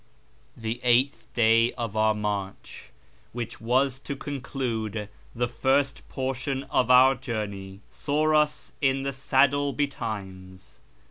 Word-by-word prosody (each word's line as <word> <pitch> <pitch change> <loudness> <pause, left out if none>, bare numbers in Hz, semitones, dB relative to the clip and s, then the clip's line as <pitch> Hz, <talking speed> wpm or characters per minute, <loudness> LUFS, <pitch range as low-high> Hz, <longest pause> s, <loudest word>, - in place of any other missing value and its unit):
The 115 +1 -4
eighth 125 +4 +2
day 115 0 +4
of 115 -4 -4
our 110 0 +3
march, 105 -2 -5 0.5
wdiich 120 -1 -5
was 130 +3 +1
to 140 +1 -5
conclude 120 -7 -4 0.3
the 120 +1 0
first 130 +4 +1
portion 135 +1 -3
of 125 -1 +2
our 130 +1 +7
journey, 105 -6 -5
saw 155 +2 0
us 150 0 +1
in 135 -1 +2
the 140 0 -2
saddle 140 +1 +2
betimes. 95 - -5
125 Hz, 120 wpm, -26 LUFS, 110-135 Hz, 0.5 s, our